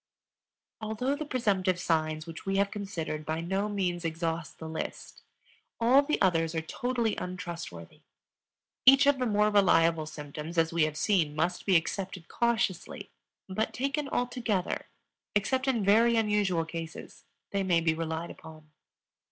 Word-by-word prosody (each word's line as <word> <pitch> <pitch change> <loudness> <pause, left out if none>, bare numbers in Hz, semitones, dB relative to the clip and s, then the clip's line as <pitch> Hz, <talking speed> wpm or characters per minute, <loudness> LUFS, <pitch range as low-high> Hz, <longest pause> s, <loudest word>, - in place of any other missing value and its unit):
Although 220 +6 -1
the 305 0 -5
presumptive 195 -8 +1
signs 155 -2 0
which 165 -1 -8
we 195 0 -1
have 200 0 +2
considered 170 -7 -4
by 155 +1 -2
no 190 +5 -1
means 180 -4 -1
exhaust 165 -1 -3
the 160 - -7
list, 160 0 -6 0.6
all 245 +4 +6
the 300 +2 -1
others 165 -3 +2
are 160 - 0
totally 235 +5 -1
untrustworthy. 170 - -7 0.9
Each 270 +1 +9
of 285 -1 +4
the 250 - +1
more 210 0 +3
reliable 165 -5 +4
symptoms, 150 +2 -7
as 165 0 +2
we 165 -2 +3
have 155 -1 -4
seen, 165 -8 +1
must 175 +5 -1
be 190 - +4
accepted 185 +1 -1
cautiously; 220 -7 -1 0.4
but 200 +3 -2
taken 275 +2 -1
altogether, 245 -7 -1 0.5
except 260 +6 +1
in 235 -6 +1
very 230 +4 +5
unusual 210 -6 +1
cases, 165 0 -8 0.3
they 200 - 0
may 180 -3 +3
be 165 -1 +2
relied 160 +1 -3
upon. 155 -1 -13
185 Hz, 145 wpm, -29 LUFS, 165-220 Hz, 0.9 s, Each